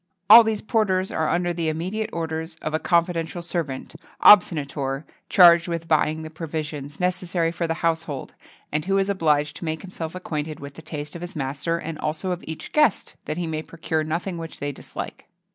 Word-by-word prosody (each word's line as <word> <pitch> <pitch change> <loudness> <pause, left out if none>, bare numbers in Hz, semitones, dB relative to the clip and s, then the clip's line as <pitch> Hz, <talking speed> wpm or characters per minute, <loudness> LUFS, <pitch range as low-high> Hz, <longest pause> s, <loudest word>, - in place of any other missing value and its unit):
[XXII 180 +1 -51
44] 215 - +12
All - - +6
these 220 -2 -1
porters 195 -5 +1
are 160 -1 0
under 175 0 +1
the 165 -2 -1
immediate 185 +8 -2
orders 160 0 -4
of 155 - -3
a 155 - +1
confidential 170 0 0
servant 160 -7 -4 0.3
obsonator 145 -7 +5 0.3
charged 170 -2 +7
with 165 -1 -3
buying 155 0 +2
the 155 - -8
provisions 150 -3 -5
necessary 180 -2 0
for 170 0 -2
the 165 - -1
household, 160 -4 -2 0.4
and 150 +1 -1
who 195 +1 +2
is 195 0 +1
obliged 150 -6 +1
to - - -7
make 160 -1 -3
himself 170 -3 -6
acquainted 155 -4 -4
with 140 0 -8
the 160 - -11
taste 150 -2 -6
of 170 - -7
his 175 0 -7
master 145 +4 -2
and 165 -1 -6
also 160 +5 -2
of 180 - -4
each 160 0 -7
guest, 300 -9 +2
that 155 - -3
he 175 - -1
may 155 -1 -3
procure 160 -1 -2
nothing 170 +3 -3
which 165 -1 -8
they 145 0 -2
dislike. - - -8
165 Hz, 195 wpm, -24 LUFS, 155-180 Hz, 0.4 s, 44